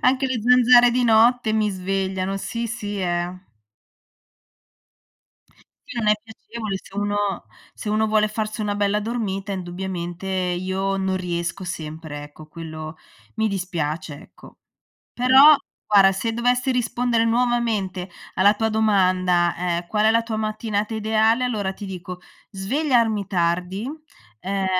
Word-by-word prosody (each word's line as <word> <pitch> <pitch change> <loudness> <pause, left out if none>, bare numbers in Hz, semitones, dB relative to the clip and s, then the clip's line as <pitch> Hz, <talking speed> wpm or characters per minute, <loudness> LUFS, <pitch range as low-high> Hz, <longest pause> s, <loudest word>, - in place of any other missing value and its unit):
anche 265 +1 +3
le 255 -4 -2
zanzare 245 0 +6
di 250 0 +1
notte 230 0 +4
mi 215 -1 +2
svegliano. 190 0 -2
Sì, 230 +4 -4
sì, 205 -3 -4
eh. 175 0 -2 2.5
Sì - - -8
non 215 -2 +1
è - - +7
piacevole, 220 -2 -6
se 195 - -17
uno 205 0 -1 0.6
se 210 - -7
uno 215 +1 +2
vuole 215 0 +2
farsi 215 0 -4
una 205 -1 -1
bella 205 0 +1
dormita 205 -3 -3
indubbiamente, 180 0 -5
io 190 +1 -1
non 190 -1 -1
riesco 175 +1 -3
sempre, 155 -3 -6
ecco, 150 +1 -12
quello 155 -1 -8 0.4
mi 220 -1 +1
dispiace, 165 -6 -3
ecco. - - -17 0.6
Però, 265 +5 +7 0.3
guarda, 195 -2 +6
se 225 +4 -2
dovessi 245 +2 +1
rispondere 240 -1 +1
nuovamente 225 -6 0 0.2
alla 200 +3 +4
tua 225 +1 0
domanda, 185 -5 +2
ehm: 175 -1 -2
"Qual 215 +2 +1
è 220 - +5
la 230 0 +2
tua 225 -1 -4
mattinata 215 0 -2
ideale?" 220 +2 +2
Allora 205 -6 -1
ti 205 - -8
dico 180 -1 -7 0.3
svegliarmi 225 0 +1
tardi, 180 +2 -1 0.6
ehm, 195 +3 -2
205 Hz, 135 wpm, -22 LUFS, 185-225 Hz, 2.5 s, è